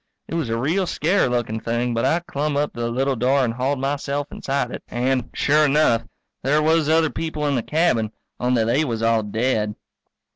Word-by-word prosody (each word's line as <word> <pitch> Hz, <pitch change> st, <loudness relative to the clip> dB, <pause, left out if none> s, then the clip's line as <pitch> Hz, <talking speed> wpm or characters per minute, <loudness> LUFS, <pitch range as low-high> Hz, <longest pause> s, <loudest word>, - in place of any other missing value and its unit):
It -, -, -8 dB
was 165 Hz, -7 st, -1 dB
a 115 Hz, -, 0 dB
real 170 Hz, +10 st, 0 dB
scarey 170 Hz, +4 st, +1 dB
lookin' 120 Hz, -3 st, -1 dB
thing 120 Hz, +2 st, -1 dB
but 115 Hz, -, 0 dB
I 170 Hz, -, +2 dB
clumb 150 Hz, -3 st, -2 dB
up 145 Hz, +1 st, 0 dB
to -, -, -9 dB
the 115 Hz, 0 st, -1 dB
little 135 Hz, +3 st, 0 dB
door 130 Hz, +3 st, +2 dB
and 115 Hz, -, -2 dB
hauled 130 Hz, +4 st, -1 dB
myself 140 Hz, +1 st, -2 dB
inside 140 Hz, +1 st, -2 dB
it. -, -, -6 dB
And, 125 Hz, 0 st, -1 dB
sure 150 Hz, +2 st, +3 dB
enough, 140 Hz, -6 st, +3 dB, 0.4 s
there 145 Hz, +4 st, +2 dB
was 160 Hz, -1 st, +3 dB
other 160 Hz, -1 st, +3 dB
people 160 Hz, -2 st, -3 dB
in 145 Hz, -, +1 dB
the 125 Hz, -, +1 dB
cabin, 125 Hz, -8 st, +1 dB, 0.3 s
only 125 Hz, -2 st, +2 dB
they 120 Hz, +7 st, +2 dB
was 115 Hz, -6 st, -2 dB
all 115 Hz, -1 st, +3 dB
dead. 110 Hz, 0 st, -1 dB
135 Hz, 205 wpm, -22 LUFS, 115-150 Hz, 0.4 s, sure